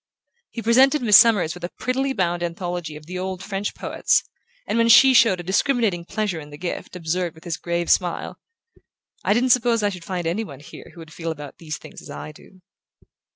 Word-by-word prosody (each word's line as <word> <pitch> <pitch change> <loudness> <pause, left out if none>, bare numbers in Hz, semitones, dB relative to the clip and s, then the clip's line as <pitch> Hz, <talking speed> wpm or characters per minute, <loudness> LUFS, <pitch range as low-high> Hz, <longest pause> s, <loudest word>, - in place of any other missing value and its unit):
He 230 - -7
presented 265 +5 +4
Miss 210 -3 +5
Summers 210 -9 +4
with 180 - -12
a 175 - -3
prettily 265 +2 -1
bound 175 -7 -1
anthology 175 -2 -4
of 150 0 -11
the 180 +2 -6
old 185 0 -4
French 200 0 -4
poets - - +1 0.4
and, 230 - -1
when 230 0 +3
she 265 +3 +8
showed 225 -7 +5
a - - -6
discriminating 195 -2 0
pleasure 205 -4 -2
in 150 -1 -11
the 145 - -11
gift, 175 +2 -6
observed 175 0 -2
with 160 - -16
his 170 -3 -3
grave 170 0 -2
smile: 175 -2 0 0.8
"I - - +3
didn't 250 +2 +2
suppose 235 -2 +3
I 205 - +2
should 180 -4 -8
find 180 -1 -4
any 175 +7 -1
one 140 -10 -10
here - - -12
who 170 - -11
would 160 -1 -13
feel 165 -1 -5
about 145 -3 -8
these 155 -3 -6
things - - -12
as - - -13
I 75 +1 -7
do." 185 - -19
180 Hz, 210 wpm, -22 LUFS, 165-225 Hz, 0.8 s, she